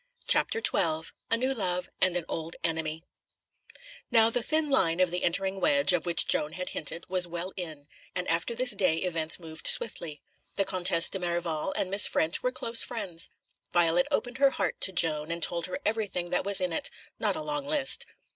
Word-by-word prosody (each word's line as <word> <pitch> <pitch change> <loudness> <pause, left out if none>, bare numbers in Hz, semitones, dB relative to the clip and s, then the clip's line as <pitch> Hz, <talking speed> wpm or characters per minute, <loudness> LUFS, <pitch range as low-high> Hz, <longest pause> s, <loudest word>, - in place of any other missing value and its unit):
CHAPTER 455 - +1
XII 160 -4 +2 0.2
A 230 - +3
New 260 +3 -1
Love 180 -6 -1
and 180 -1 +3
an 170 - -5
Old 165 0 -6
Enemy 160 -1 -3 1.1
Now, 230 -2 +4
the 245 - 0
thin 300 +4 0
end 170 -9 +2
of 185 -2 +2
the 180 - -3
entering 190 +2 0
wedge, 280 -4 +4
of 180 - -1
which 170 - +3
Joan 150 +1 +1
had 185 0 -5
hinted, 165 +3 -3
was 185 -1 +2
well 175 +2 -5
in, 155 -6 -7 0.3
and 180 0 -3
after 170 +8 -1
this 250 +1 +3
day 180 -5 +1
events 165 -2 0
moved 160 -2 -4
swiftly. 165 - +1 0.3
The 195 - +1
Comtesse 175 -2 +3
de 195 - -3
Merival 175 -1 -3
and 185 - -1
Miss 200 0 +6
Ffrench 160 +2 +1
were 250 - -1
close 230 -2 +2
friends. 195 -8 -3 0.4
Violet 175 0 +2
opened 245 +1 -2
her 275 0 +5
heart - - -3
to 190 - +3
Joan 160 -3 0
and 170 0 -3
told 170 0 +1
her 185 - -4
everything 205 -5 -2
that - - 0
was 200 -1 +4
in 180 -2 -2
it - - 0 0.3
not - - 0
a 310 - -5
long 295 -2 -1
list. 285 -3 +2
180 Hz, 195 wpm, -27 LUFS, 165-225 Hz, 1.1 s, Miss